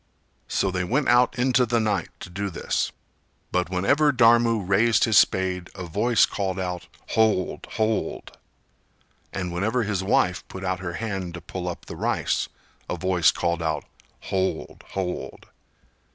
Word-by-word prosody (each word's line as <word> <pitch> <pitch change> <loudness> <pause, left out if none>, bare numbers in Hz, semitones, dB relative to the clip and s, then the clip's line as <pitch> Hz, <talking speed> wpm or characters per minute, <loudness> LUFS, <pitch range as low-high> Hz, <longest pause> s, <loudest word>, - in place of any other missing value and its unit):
So 95 - 0
they 90 -1 -1
went 130 +10 0
out 125 +2 +4
into 125 +1 +3
the 120 -1 +1
night 105 -5 0
to 90 - -8
do 100 +2 -3
this. 85 - -1 0.6
But 90 -1 0
whenever 140 +12 +3
Dharmu 115 -4 +4
raised 105 +4 +4
his 110 -2 +6
spade 90 -1 +1
a 95 - -6
voice 105 +7 +3
called 95 -2 -3
out 90 -1 -4 0.2
"Hold, 110 -4 +1
hold!" 110 0 -1 1.0
And 90 -2 -4
whenever 110 +7 0
his 100 -3 -1
wife 90 -1 +2
put 95 - -8
out 95 -1 -1
her 90 -2 -4
hand 95 -4 -4
to 85 - -7
pull 90 +2 -5
up 85 - -7
the - - -8
rice - - 0 0.4
a - - -2
voice 90 -3 +3
called 85 -1 0
out 80 -2 -1 0.4
"Hold, 95 0 -2
hold!" 90 -2 -4
95 Hz, 150 wpm, -25 LUFS, 90-110 Hz, 1.0 s, his